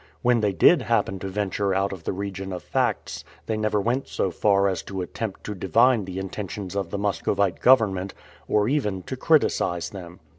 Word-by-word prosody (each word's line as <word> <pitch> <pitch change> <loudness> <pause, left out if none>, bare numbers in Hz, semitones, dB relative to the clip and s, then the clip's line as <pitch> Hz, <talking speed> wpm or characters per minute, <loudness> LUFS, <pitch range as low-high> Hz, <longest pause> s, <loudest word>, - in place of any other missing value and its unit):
When 120 -1 +4
they 105 -2 +2
did 130 - +5
happen 105 -5 0
to 95 - -5
venture 100 0 -1
out 95 +1 0
of 85 -4 -10
the - - 0
region 95 0 -5
of 90 - -5
facts, - - -1 0.2
they 110 - -1
never 110 -1 0
went 120 +6 -1
so 95 - -1
far 100 +1 +2
as 95 -4 -1
to 95 -1 -5
attempt 105 +2 -6
to 105 - -4
divine 110 +4 +3
the 95 0 -7
intentions 95 0 -5
of 100 -4 -2
the 100 - -3
Muscovite 100 -2 0
government, 100 -7 +3 0.3
or 105 0 +2
even 105 -9 -1
to 130 - -5
criticize 130 - +1
them. 90 -3 -10
100 Hz, 190 wpm, -24 LUFS, 95-110 Hz, 0.3 s, did